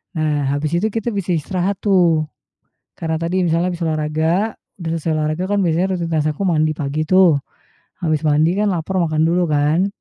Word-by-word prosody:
Nah 150 -3 0
habis 145 +2 -1
itu 215 +5 +1
kita 225 +2 -2
bisa 195 -3 -3
istirahat 185 +5 -2
tuh, 175 -6 +3 0.8
karena 160 -1 -2
tadi, 170 +3 -1
misalnya 170 +2 +1
habis 175 - -7
olahraga, 160 +6 0 0.3
udah 165 -1 -3
selesai 160 0 -2
olahraga 155 +3 -1
kan - - +2
biasanya 180 +3 +1
rutinitas 165 -3 -1
aku 155 +6 -3
mandi 155 -4 +2
pagi 150 +1 -2
tuh, 185 -5 +5 0.6
habis 155 -4 -1
mandi 155 +2 +2
kan 210 -1 +2
lapar, 185 +1 -2
makan 155 -3 +1
dulu 175 +1 +2
kan, 150 +5 +2
165 Hz, 175 wpm, -19 LUFS, 155-185 Hz, 0.8 s, tuh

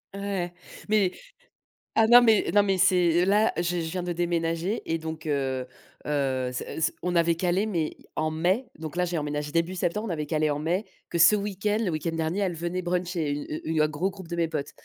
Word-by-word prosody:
Ouais, - - -6
ouais 185 -3 -2 0.3
mais 205 -4 +3 0.8
ah 220 0 +5
non, 245 +1 +9
mais 220 -3 +4
non, 205 -1 +6
mais 195 -2 +1
c'est 180 -1 +4
là, 210 +3 +3
je - - +1 0.2
je 160 0 -4
viens 185 - -2
de 175 -1 -2
déménager 170 +3 -1
et 165 - +1
donc 160 0 -7
heu, 130 -3 -1 0.4
heu, 135 -3 0
s 125 - -4
s 160 - -1
on 180 -1 -1
avait 170 0 +3
calé, 180 +4 +1
mais 170 -7 -2 0.2
en 155 0 0
mai, 180 +10 +1
donc 160 +1 -6
là, 180 0 +1
j'ai 170 -1 -2
emménagé 150 0 -3
début 170 +3 0
septembre. 210 +5 -1
On - - -5
avait 150 -2 -2
calé 155 0 +1
en 145 0 -1
mai, 175 +7 -1 0.2
que 170 - -2
ce 170 +6 +7
week-end, 205 +1 -1
le 180 - 0
week-end 165 +1 -2
dernier, 165 +4 -1
elles 185 -4 0
venaient 175 +3 -3
bruncher 175 -3 -1 0.4
une 160 -1 +1
un 155 - +4
gros 155 +6 -1
groupe 190 -3 -11
de 170 - -4
mes 165 -1 +2
potes, 150 -3 -4
170 Hz, 220 wpm, -26 LUFS, 155-190 Hz, 0.8 s, non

